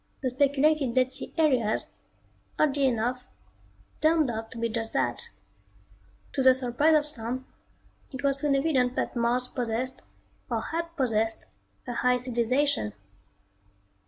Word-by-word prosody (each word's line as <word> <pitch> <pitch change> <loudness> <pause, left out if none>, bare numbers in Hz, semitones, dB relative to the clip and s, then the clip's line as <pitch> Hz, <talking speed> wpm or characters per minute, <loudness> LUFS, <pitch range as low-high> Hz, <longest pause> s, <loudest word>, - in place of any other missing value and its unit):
The 255 - 0
speculated 280 0 +2
dead 255 0 +2
sea - - -3
areas, 255 -9 +2 0.7
oddly 285 -2 +2
enough, 245 +1 0 0.8
turned 310 -4 +3
out 225 0 -5
to - - -10
be 230 0 0
just 225 0 -4
that. 470 - -1 1.0
To 270 - 0
the 260 -1 +6
surprise 260 +5 +2
of 300 -1 +3
some, 255 -2 -3 0.7
it 265 0 -7
was 275 -1 +2
soon 285 -1 +2
evident 270 -4 +1
that - - -2
Mars 240 +1 +1
possessed, 250 +1 -2 0.5
or - - 0
had 335 +1 -3
possessed, 225 -4 +1 0.4
a 245 - -3
high 250 +1 +2
civilization. 250 - 0
255 Hz, 130 wpm, -27 LUFS, 235-285 Hz, 1.0 s, the